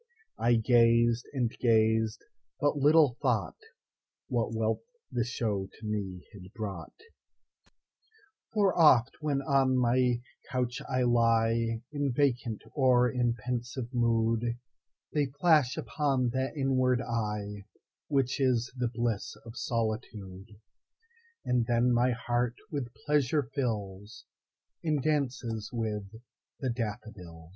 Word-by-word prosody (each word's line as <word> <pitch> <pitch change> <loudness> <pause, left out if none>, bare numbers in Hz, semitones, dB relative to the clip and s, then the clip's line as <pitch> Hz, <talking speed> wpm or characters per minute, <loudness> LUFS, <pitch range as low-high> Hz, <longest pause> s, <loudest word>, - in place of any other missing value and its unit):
I 120 +1 +3
gazed, 115 0 +3
and 125 -5 0
gazed, 110 -1 +2 0.4
but 145 -1 +2
little 145 -2 +4
thoughtWhat 110 - +1 1.0
wealth 110 0 0 0.3
the 120 - 0
show 105 -5 -2
to 110 - -12
me 100 -4 -4
had 95 -2 -12
brought:For 210 - -6
oft, 135 -7 +5
when 140 -2 0
on 135 -1 +2
my 125 0 +2 0.3
couch 125 0 -2
I 130 -1 +1
lieIn 115 -1 +2 0.3
vacant 125 -5 0
or 125 -3 +4
in 120 -1 +1
pensive 120 +2 -4
mood, 115 0 +1 0.6
They 145 -2 +1
flash 150 -5 +4
upon 135 -5 0
that 130 +4 -2
inward 130 -2 +2
eyeWhich 105 -4 -3 0.8
is 125 -2 +1
the 125 -1 0
bliss 115 -4 -2
of 115 0 -10
solitude; 110 -4 -4 0.9
And 125 -2 +1
then 120 +1 +3
my 120 +1 +3
heart 120 0 -1 0.2
with 135 -6 -3
pleasure 150 0 +2
fills, 105 -5 -4 0.6
And 155 -3 +1
dances 125 -7 -1
with 110 -4 -3 0.5
the 130 -3 -1
daffodils. 105 -8 -6
120 Hz, 105 wpm, -29 LUFS, 110-130 Hz, 1.0 s, oft